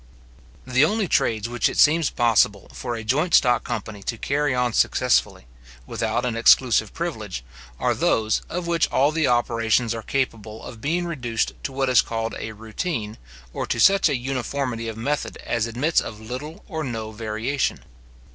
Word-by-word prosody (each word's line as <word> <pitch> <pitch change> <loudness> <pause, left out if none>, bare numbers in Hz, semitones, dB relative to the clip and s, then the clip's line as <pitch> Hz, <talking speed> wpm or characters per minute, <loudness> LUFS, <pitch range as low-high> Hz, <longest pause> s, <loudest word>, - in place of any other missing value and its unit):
The 130 +2 +3
only 205 +5 +1
trades 110 -7 +1
which 120 -3 +1
it - - -6
seems 160 0 +5
possible 110 -4 +2
for 120 -2 -4
a 115 - -6
joint 150 +10 +2
stock 125 -2 +4
company 110 -3 -5
to 115 +4 -4
carry 145 +2 0
on 125 -2 0
successfully, 125 - +2 0.4
without - - -2
an 120 -2 -1
exclusive 115 -2 +4
privilege, 110 - -5 0.4
are - - +2
those, 110 -1 +1
of 180 +1 -3
which 170 -1 +1
all 140 +3 +3
the 155 -2 +1
operations 115 -1 +1
are 115 - -5
capable 110 -4 -3
of 115 -3 -10
being 170 +6 0
reduced 120 -9 -2
to - - -2
what 135 0 -1
is 125 -3 +5
called 115 0 -3
a 110 - -5
routine, 110 - -4 0.3
or - - -3
to - - -1
such 195 -4 +5
a 140 - 0
uniformity 125 -2 -3
of 110 -1 -5
method 145 +6 -2
as 115 -1 0
admits 130 +8 +1
of 105 - -7
little 130 +8 -7
or 160 -1 -4
no 110 -4 -4
variation. 110 +5 -2
120 Hz, 170 wpm, -23 LUFS, 110-145 Hz, 0.4 s, seems